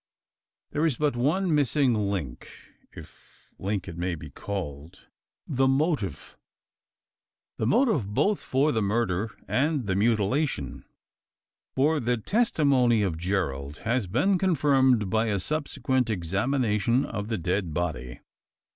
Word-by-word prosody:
There 150 - -1
is 160 -6 +2
but 150 0 0
one 160 +8 +1
missing 145 -2 +2
link 100 - -3 0.4
if - - -16
link 100 -1 -2
it 85 -2 -7
may 90 0 -1
be 75 -2 -10
called 85 -2 -6 0.4
the 135 -1 +1
motive. 135 - -1 1.2
The 110 - -1
motive 145 - +2
both 200 - +1
for 140 +4 +1
the 110 - 0
murder 105 -1 0 0.2
and 145 -1 0
the 95 - 0
mutilation: 110 - 0 0.9
for 150 +4 +2
the 120 0 0
testimony 135 - +2
of 85 -5 -2
Gerald 75 -6 -2
has 115 -3 0
been 180 - +2
confirmed 135 - +3
by 110 +1 +2
a 100 -2 0
subsequent 130 - -1
examination 110 - 0
of 105 -2 -5
the 110 -1 -2
dead 90 0 -1
body. 70 -7 -4
115 Hz, 125 wpm, -26 LUFS, 95-140 Hz, 1.2 s, confirmed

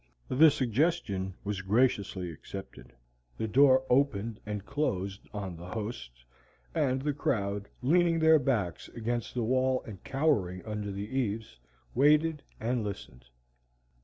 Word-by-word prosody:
The 155 +5 +7
suggestion 125 - 0
was 100 -1 -3
graciously 100 -4 +1
accepted, 80 -5 -10 0.5
the 110 - -2
door 130 +3 +5
opened 115 -5 +1
and 105 -1 -4
closed 100 -9 -2
on 95 -4 -5
the 85 +2 -9
host, 90 - -6 0.5
and 130 -1 +1
the 150 0 0
crowd, 100 -7 -1
leaning 170 +4 +4
their 160 -1 +6
backs 115 - -1
against 120 +1 -3
the 120 - 0
wall 130 +2 +1
and 100 -5 -10
cowering 115 - 0
under 105 -2 -4
the 100 +1 -5
eaves, 110 - -2 0.3
waited 150 +3 +4 0.2
and 120 +1 -1
listened. 95 -11 -7
110 Hz, 130 wpm, -30 LUFS, 100-135 Hz, 0.5 s, The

